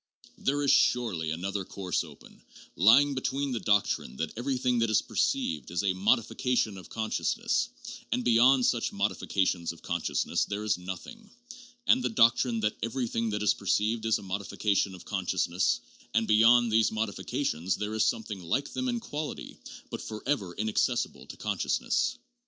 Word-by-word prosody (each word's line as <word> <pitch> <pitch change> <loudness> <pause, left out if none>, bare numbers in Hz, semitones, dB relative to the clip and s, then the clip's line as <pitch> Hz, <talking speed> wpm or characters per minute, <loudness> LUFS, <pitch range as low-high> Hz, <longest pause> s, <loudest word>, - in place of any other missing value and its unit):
There 145 +1 0
is 140 - +4
surely 100 -10 +2
another 95 +5 -3
course 95 0 -2
open, - - -15 0.3
lying 135 +10 +6
between 135 +1 -2
the 120 - -1
doctrine 100 - +1
that 80 +2 -3
everything 125 0 0
that 115 -1 +2
is 110 - +3
perceived 75 -5 -1
is 85 +4 -2
a 95 -2 +2
'modification 115 +3 +1
of 90 - -13
conscious 110 -1 -1
ness' - - 0 0.4
and 125 - 0
beyond 125 +2 +5
such 120 -2 +1
'modifications 95 -3 0
of 85 - -14
consciousness' 85 -2 -1
there 105 +1 -4
is 105 -2 +1
nothing, 205 - -8 0.6
and 255 - +4
the - - +1
doctrine 115 - +3
that 105 0 0
everything 115 0 -1
that 105 0 -2
is 105 - +4
perceived 110 +3 0
is 110 - +3
a - - -11
'modification 100 0 -1
of 90 - -13
consciousness' 95 -2 0 0.3
and 115 -1 +2
beyond 115 +2 +5
these 110 0 +3
'modifications' 100 -5 -2
there 105 +1 -4
is 110 - +2
something 105 -4 -2
like 135 +12 -2
them 255 0 -2
in 240 -1 -1
quality, 155 -9 -6 0.4
but - - -5
forever 110 -4 -3
inaccessible 120 +3 -1
to - - -10
consciousness. - - 0
110 Hz, 160 wpm, -29 LUFS, 95-120 Hz, 0.6 s, lying